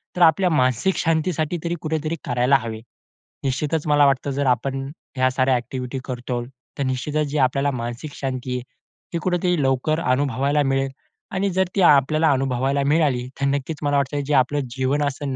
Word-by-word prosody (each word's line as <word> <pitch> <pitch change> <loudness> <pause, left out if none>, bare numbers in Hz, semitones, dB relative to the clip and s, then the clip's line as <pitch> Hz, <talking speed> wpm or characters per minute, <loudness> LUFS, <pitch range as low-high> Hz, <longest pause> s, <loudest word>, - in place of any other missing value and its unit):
तर 180 - -2
आपल्या 175 +3 +5
मानसिक 130 - +2
शांतीसाठी 165 0 0
तरी 170 0 -1
कुठेतरी 155 0 -2
करायला 125 +3 +3
हवे. 110 -1 -6 0.6
निश्चितच 150 +4 -1
मला 145 -1 +5
वाटतं 140 0 +1
जर 140 +1 -1
आपण 135 +2 0 0.3
ह्या 130 0 +3
साऱ्या 130 0 +2
ॲक्टिव्हिटी 125 +1 -4
करतो. 125 -1 -3 0.3
तर 140 - -1
निश्चितच 145 +4 -1
जी 150 - -2
आपल्याला 135 +2 +2
मानसिक 120 +4 -5
शांती 130 -2 -3
आहे, 125 - -2 0.5
ती 170 - +1
कुठेतरी 180 -3 +1
लवकर 135 +4 +1
अनुभवायला 140 +1 +1
मिळेल 135 0 +1 0.4
आणि 195 +1 0
जर 190 +1 +2
ती 195 - +2
आपल्याला 155 0 +5
अनुभवायला 135 +1 0
मिळाली, 145 -5 +2
तर 140 - +2
नक्कीच 140 +3 -2
मला 145 0 +2
वाटतं 140 +1 0
जे 145 - -1
आपलं 145 +3 -3 0.2
जीवन 135 +3 +1
असंन 140 -1 -2
140 Hz, 170 wpm, -22 LUFS, 130-155 Hz, 0.6 s, आपल्या